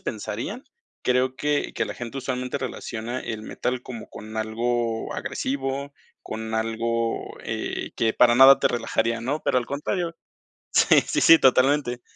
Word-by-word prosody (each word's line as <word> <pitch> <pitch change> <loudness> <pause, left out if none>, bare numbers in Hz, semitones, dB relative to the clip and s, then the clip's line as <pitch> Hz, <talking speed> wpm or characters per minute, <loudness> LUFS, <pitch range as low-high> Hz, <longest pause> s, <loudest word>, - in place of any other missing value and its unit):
pensarían, 120 - -5 0.4
creo 125 +1 +1
que 145 +1 -1
que - - 0
la - - -5
gente 120 +2 -7
usualmente 125 0 -3
relaciona 120 -2 -5
el 110 -1 -5
metal 125 +2 -3
como 120 -3 -8
con 110 +1 -10
algo 115 +1 -1
agresivo, 135 +1 -3 0.3
con 110 0 -5
algo, 115 +1 -2
eh, - - -4
que 110 -1 +1
para 120 -1 +5
nada 135 +2 +9
te - - +2
relajaría, 115 -1 -1
¿no?, 140 +6 -2
pero - - +3
al 120 - -4
contrario 165 +5 -3 0.6
Sí, - - +6
sí, - - 0
sí, 165 - +9
totalmente. 130 -2 +3
125 Hz, 150 wpm, -24 LUFS, 115-135 Hz, 0.6 s, nada